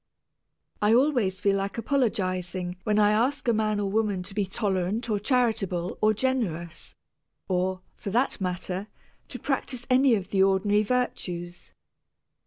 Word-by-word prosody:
I 210 +2 +5
always 245 -8 +2
feel 200 -1 +2
like 195 +2 -3
apologizing 185 -8 -1
when 210 -1 +2
I 210 0 +5
ask 245 +6 +1
a 235 - +4
man 215 -1 +1
or - - 0
a - - 0
woman 200 -2 0
to 195 +2 -9
be 200 -1 -1
tolerant 200 +3 -1
or 210 - +1
charitable 210 -7 0
or 215 - +5
generous 210 -9 -2 0.5
or, 185 0 0 0.2
for - - -5
that 240 +1 0
matter, 185 +2 -3 0.4
to - - -7
practice 245 -2 -3
any 255 -1 +5
of 195 -2 -4
the 195 - +2
ordinary 195 +2 +3
virtues. 180 -7 -3
205 Hz, 150 wpm, -26 LUFS, 185-230 Hz, 0.5 s, I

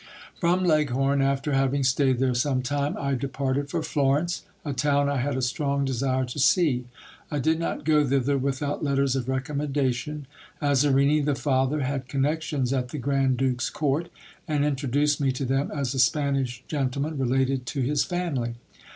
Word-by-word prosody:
From 180 +2 +2
Leghorn, 140 -4 +2
after 140 +1 0
having 135 +1 +1
staid 130 0 +2
there 130 0 +1
some 130 +1 0
time, 145 +2 -1
I 140 -1 -1
departed 135 +1 -2
for 165 +1 -2
Florence, 150 +4 0 0.2
a 145 - -2
town 145 +1 +2
I 140 0 0
had 130 +1 -1
a 130 - -1
strong 140 +2 0
desire 130 0 0
to 125 +4 -6
see. 135 -4 +3 0.4
I 150 - -2
did 160 +3 +1
not 165 - -3
go 150 -1 +4
thither 140 0 +1
without 140 +2 -2
letters 140 -2 +1
of 130 -1 -2
recommendation. 140 +1 -2 0.3
r 145 -1 +1
Azarini 140 +2 +3
the 145 -1 +1
father 135 +1 +1
had 135 -1 -2
connections 140 -1 -1
at 130 -2 -1
the 150 - -5
grand 135 -1 +1
duke's 130 -1 0
court, 155 +3 -1 0.4
and 145 -2 +1
introduced 145 +1 +1
me 135 -1 +2
to 130 +1 -3
them 135 +2 0
as 140 -3 -2
a 135 - -2
Spanish 130 -2 +1
gentleman 140 +1 -2
related 130 0 0
to 135 - -2
his 140 +3 +1
family. 145 -10 -2
140 Hz, 170 wpm, -25 LUFS, 130-145 Hz, 0.4 s, go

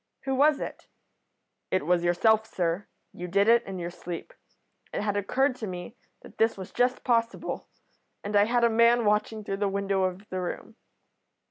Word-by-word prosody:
"'Who 270 - -2
was 290 +2 +4
it?' - - -7 0.8
"'It 185 - 0
was 175 +1 +2
yourself, 220 +5 +3
sir. 175 0 -2 0.3
You 180 - -6
did 200 +3 +2
it 235 +1 +6
in 190 -1 -5
your 175 -1 -4
sleep. 175 -1 -7 0.6
It - - -2
had 205 -1 -1
occurred 255 +7 +1
to 220 - -5
me 180 +4 -7 0.3
that - - -15
this 225 -1 +3
was 190 -1 -8
just 245 +1 +1
possible, 230 -1 -1 0.6
and 205 +1 -3
I 205 0 +6
had 240 +2 +1
a 235 - +5
man 235 +1 +4
watching 210 +1 +1
through 195 -1 -3
the 200 0 0
window 195 -1 0
of 185 +3 -4
the 185 0 -3
room.' 180 +5 -5
205 Hz, 185 wpm, -27 LUFS, 185-230 Hz, 0.8 s, it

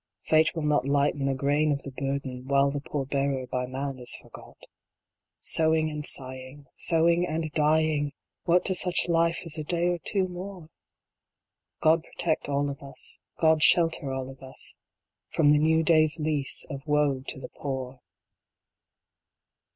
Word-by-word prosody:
Fate 155 +1 +3
will 160 - -3
not 150 -3 +1
lighten 140 0 +1
a 135 - 0
grain 145 +3 +1
of 140 -1 -2
the 140 - -7
burden 135 -1 -4
While 140 0 +3
the 145 0 -4
poor 145 -1 -3
bearer 135 -1 -1
by 125 0 -3
man 135 +1 -4
is 125 - -1
forgot - - -13 0.8
Sewing 160 -1 +2
and 150 0 -5
sighing! 130 +1 -5
Sewing 170 +1 +3
and 155 -1 -3
dying! 155 -1 +2 0.3
What 175 +1 +3
to 190 - +1
such 180 -1 +1
life 170 0 +1
is 160 -1 -3
a - - -3
day 175 +3 0
or 175 -1 -1
two 190 +2 0
more? 180 -2 -8 1.1
God 160 +1 +4
protect 160 -4 -2
all 140 0 +1
of 140 - -9
us 140 -1 -9 0.2
God 160 -1 +3
shelter 165 -4 +4
all 130 0 -4
of 135 - -16
us 130 0 -9 0.5
From 145 -3 +3
the 150 - +5
new 160 +1 +3
day 155 -1 +5
s 155 +1 -3
lease 150 -3 0
of 135 -1 -5
woe 145 -3 +2
to 140 - -4
the - - -8
Poor 130 -2 -5
150 Hz, 165 wpm, -27 LUFS, 140-160 Hz, 1.1 s, the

